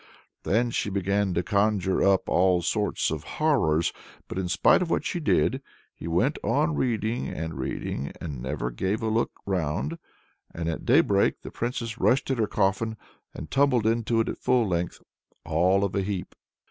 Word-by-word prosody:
Then 120 +4 +1
she 105 - -1
began 100 0 0
to 85 - +1
conjure 100 -2 +1
up 100 -1 +3
all 90 -1 +3
sorts 105 +1 0
of 80 -2 -3 0.2
horrors. 85 - +2 0.3
But - - -4
in 90 -2 -2
spite 90 - +4
of 175 - -1
all - - +3
that - - -6
she 175 - -2
did, 140 -3 +1 0.3
he - - -8
went 85 +1 +1
on 80 - +1
reading 115 - -1
and 80 +1 -4
reading, 65 +1 -4
and 70 -7 -6
never - - -3
gave 95 - -2
a 110 - 0
look 115 +2 +1 0.2
round. 80 -4 -2 0.6
And 85 -1 -3
at 80 - -3
daybreak 100 -1 +3
the - - -8
Princess 115 -2 -4
rushed 135 +1 +2
at 130 - -1
her 110 - +2
coffin, 105 +3 0 0.4
and 75 - -8
tumbled 135 -5 +3
into 115 0 +1
it - - -2
at - - -4
full 125 -3 +2
length, 85 -1 -2 0.4
all 90 +5 +2
of 100 - -1
a 100 - +1
heap. 95 -2 -4
100 Hz, 180 wpm, -26 LUFS, 85-115 Hz, 0.6 s, spite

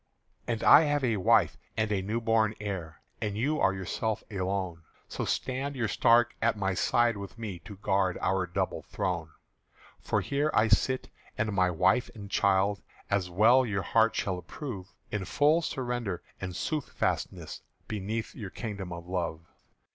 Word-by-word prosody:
"And 115 -2 -1
I 160 - +8
have 145 -1 +1
a 115 -4 +2
wife 95 - +3 0.2
and 110 -1 +1
a 100 -2 +1
newborn 110 +1 +1
heir, 95 -6 -5 0.2
And 105 -1 -2
you 145 +7 +1
are 95 - +4
yourself 100 +3 -2
alone; 95 -3 -2 0.3
So - - -3
stand 135 +2 -2
you 120 -4 0
stark 120 +3 +4
at 115 -1 +2
my 95 -2 0
side 120 +4 +2
with 100 +3 -8
me 105 -6 -5
To 100 - -8
guard 95 -1 +1
our 95 -1 +1
double 85 - -2
throne." 85 -4 -3 0.7
"For - - 0
here 145 +2 0 0.2
sit 130 +5 +2
I - - -27
and 105 -1 -3
my 90 -2 +3
wife 90 +8 +2
and 100 -2 -9
child, 100 +1 +2 0.3
As 100 -3 +1
well 110 +9 +5
your 105 -5 -1
heart 115 0 +3
shall 95 -2 -1
approve, 100 - -7 0.2
In 105 -2 -2
full 150 - +3
surrender 120 - -3 0.2
and 90 -2 -4
soothfastness, 155 -3 -2 0.3
Beneath 110 +2 -3
your 100 -5 -7
Kingdom 100 -4 -6
of 85 0 -7
Love." 85 -3 -3
105 Hz, 160 wpm, -29 LUFS, 95-120 Hz, 0.7 s, I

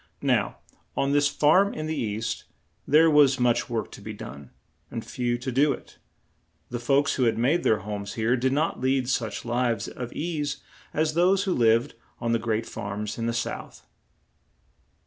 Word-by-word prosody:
Now, - - +1 0.4
on 140 - +1
this 145 0 +4
farm 170 +8 +3
in 155 - -4
the 160 0 -2
east, 110 -2 -3 0.4
there 155 +3 +6
was 145 -4 +5
much 120 -1 +2
work 115 -2 -3
to - - -11
be 110 +1 -6
done, 70 -9 -9 0.4
and 115 -2 -5
few 120 -1 -1
to 130 +2 -4
do 140 +3 +3
it; - - -12 0.7
the 120 - -3
folks 140 +4 +2
who 130 - +3
had 115 - +2
made 140 +9 +2
their 110 -3 +2
homes 105 0 -5
here 115 +3 +1
did 130 +1 +1
not 150 -1 0
lead 130 -1 +1
such 115 -4 -2
lives 120 -2 0
of 120 -1 -6
ease 150 -4 -3 0.3
as 155 0 0
those 185 +4 +3
who 190 -2 0
lived 115 0 +3 0.3
on 115 -1 -1
the 115 - +2
great 110 0 -1
farms 105 +2 -5
in 115 - -1
the - - +1
South. 120 0 -5
125 Hz, 180 wpm, -26 LUFS, 115-145 Hz, 0.7 s, there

